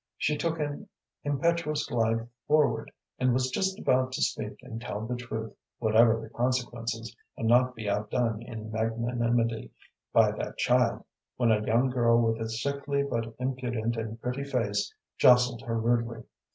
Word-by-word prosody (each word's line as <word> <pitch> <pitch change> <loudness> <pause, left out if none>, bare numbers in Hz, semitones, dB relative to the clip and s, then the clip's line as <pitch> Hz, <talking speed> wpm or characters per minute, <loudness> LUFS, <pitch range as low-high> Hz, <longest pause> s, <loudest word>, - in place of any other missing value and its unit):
She 150 - +1
took 165 +2 -1
an 150 +7 -4 0.3
impetuous 150 +1 0
glide 115 -1 0 0.2
forward, 150 -1 +2 0.3
and 125 -1 +3
was 130 0 +1
just 190 +4 0
about 130 -8 +2
to - - 0
speak 105 -1 -2
and 115 -3 -7
tell 105 -1 -4
the 125 +2 -2
truth, 110 -3 -5 0.2
whatever 115 0 +4
the 110 - -9
consequences, 120 -2 -2 0.2
and 115 - -1
not 125 +2 +4
be 110 -2 -6
outdone 105 +2 0
in 110 -2 -7
magnanimity 115 +1 0 0.4
by - - +5
that - - -5
child, - - +2 0.3
when 120 -2 +3
a 105 -1 +2
young 120 +4 +2
girl 120 -2 +4
with 115 -1 +1
a 110 - -2
sickly 140 +4 -1
but 115 -4 -3
impudent 125 -3 -2
and 115 0 -5
pretty 125 +4 -3
face 140 - -1 0.3
jostled 125 -1 +5
her 115 -3 -2
rudely. 115 0 0
120 Hz, 155 wpm, -28 LUFS, 115-130 Hz, 0.4 s, by